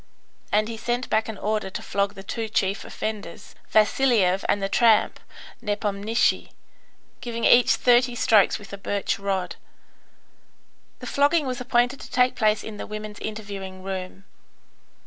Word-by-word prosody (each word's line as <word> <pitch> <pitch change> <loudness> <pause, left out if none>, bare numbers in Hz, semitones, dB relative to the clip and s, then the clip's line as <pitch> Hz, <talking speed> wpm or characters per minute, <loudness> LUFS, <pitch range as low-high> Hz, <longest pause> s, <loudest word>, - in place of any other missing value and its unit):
And 215 +1 +2
he 230 0 -6
sent 240 +2 -3
back 220 +1 +1
an 220 - -6
order 215 -1 -2
to - - -6
flog 200 0 -1
the 195 - -9
two 225 +2 -4
chief 195 -1 0
offenders, 215 -5 -6 0.2
Vasiliev 215 -4 +3
and 205 - +2
the 195 - -1
tramp, 225 +1 +3 0.4
Nepomnishy, 210 0 0 0.7
giving 235 -1 -3
each 245 0 +6
thirty 245 0 +3
strokes 215 -3 +4
with 200 -1 -13
a 200 - -7
birch 200 0 -2
rod. 190 -3 -2 1.4
The - - -7
flogging 290 +2 +2
was 255 -1 -3
appointed 245 +1 +1
to - - -10
take 250 0 +2
place 215 -3 +1
in 220 -1 -8
the - - -6
women's 215 0 -7
interviewing 200 -3 -7
room. 190 0 -6
215 Hz, 145 wpm, -24 LUFS, 200-240 Hz, 1.4 s, each